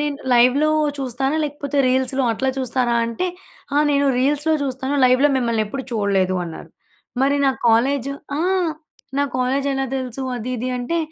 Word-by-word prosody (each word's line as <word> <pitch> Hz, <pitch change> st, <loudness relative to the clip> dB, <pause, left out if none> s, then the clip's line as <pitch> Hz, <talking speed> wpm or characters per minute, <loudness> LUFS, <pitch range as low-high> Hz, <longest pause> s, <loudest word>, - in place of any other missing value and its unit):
నేను 295 Hz, -1 st, -1 dB, 0.2 s
లైవ్‌లో 255 Hz, +5 st, +4 dB, 0.3 s
చూస్తానా? 270 Hz, +3 st, -1 dB
లేకపోతే 290 Hz, -1 st, -4 dB
రీల్స్‌లో 260 Hz, +1 st, +1 dB
అట్లా 265 Hz, +4 st, -1 dB
చూస్తారా? 250 Hz, -1 st, 0 dB
అంటే, 235 Hz, +11 st, -2 dB, 0.5 s
"ఆ! -, -, +4 dB
నేను 280 Hz, 0 st, +2 dB
రీల్స్‌లో 295 Hz, +4 st, +1 dB
చూస్తాను. 265 Hz, +1 st, -2 dB
లైవ్‌లో 255 Hz, +3 st, +5 dB
మిమ్మల్ని 235 Hz, -4 st, +1 dB
ఎప్పుడు 265 Hz, +5 st, -5 dB
చూడలేదు" 195 Hz, -4 st, +1 dB
అన్నారు. 165 Hz, -2 st, -9 dB, 0.5 s
మరి 280 Hz, +1 st, +3 dB
నా -, -, +5 dB, 0.2 s
కాలేజ్, 265 Hz, +4 st, +2 dB, 0.3 s
ఆ! 305 Hz, -, -1 dB, 0.8 s
నా -, -, +3 dB
కాలేజ్ 260 Hz, +2 st, 0 dB
ఎలా 270 Hz, 0 st, -1 dB
తెలుసు? 260 Hz, 0 st, -4 dB
అది, 240 Hz, +1 st, -5 dB
ఇది, 250 Hz, +3 st, -3 dB
అంటే, 335 Hz, +8 st, -2 dB
265 Hz, 150 wpm, -21 LUFS, 245-280 Hz, 0.8 s, లైవ్‌లో